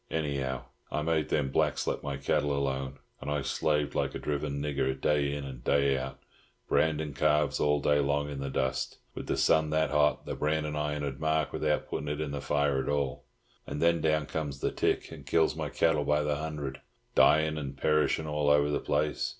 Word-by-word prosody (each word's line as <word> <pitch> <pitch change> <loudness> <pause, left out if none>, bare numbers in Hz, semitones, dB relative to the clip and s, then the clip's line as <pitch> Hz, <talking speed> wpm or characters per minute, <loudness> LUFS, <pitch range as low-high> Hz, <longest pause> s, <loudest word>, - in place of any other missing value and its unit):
Anyhow, 70 -4 -2 0.3
I 75 - -1
made 80 -1 0
them 70 -3 0
blacks - - +1
let - - -1
my 70 -1 -3
cattle 70 +1 0
alone. 70 -1 -2 0.2
And - - -5
I 75 -1 0
slaved 75 0 0
like - - -1
a - - -1
driven 70 -1 -2
nigger, 70 -2 -1
day 70 -1 +2
in 70 0 -4
and 65 -3 -8
day 70 0 +3
out, 65 0 -4 0.5
brandin' 80 -2 +1
calves 75 +1 +2
all 75 0 +3
day 75 0 +3
long 70 +1 +1
in 70 -1 -5
the 70 0 -3
dust, 65 0 -1 0.2
with - - -7
the - - 0
sun 80 -1 +3
that 80 +1 +1
hot, 75 0 +2
the - - -3
brandin' 75 0 -1
iron 75 0 -2
'ud 70 -2 -4
mark 80 -1 0
without 75 -1 0
puttin' 75 - -4
it 75 0 -2
in 75 -2 -2
the 70 -1 -4
fire 70 -2 +1
at 65 - -4
all. 70 -3 -1 0.4
And 70 - -4
then 85 0 +3
down 75 -1 +2
comes 75 -3 -4
the - - 0
tick, - - 0
and 80 -3 -9
kills 80 +3 +2
my 80 -2 -3
cattle 75 0 +2
by 75 +1 +2
the 75 -1 0
hundred, 75 -3 -5 0.3
dyin' 80 0 +4
and 70 -2 -6
perishin' 75 +2 +2
all 75 -1 0
over 75 0 +4
the - - +1
place. 75 +1 0
75 Hz, 205 wpm, -29 LUFS, 70-75 Hz, 0.5 s, dyin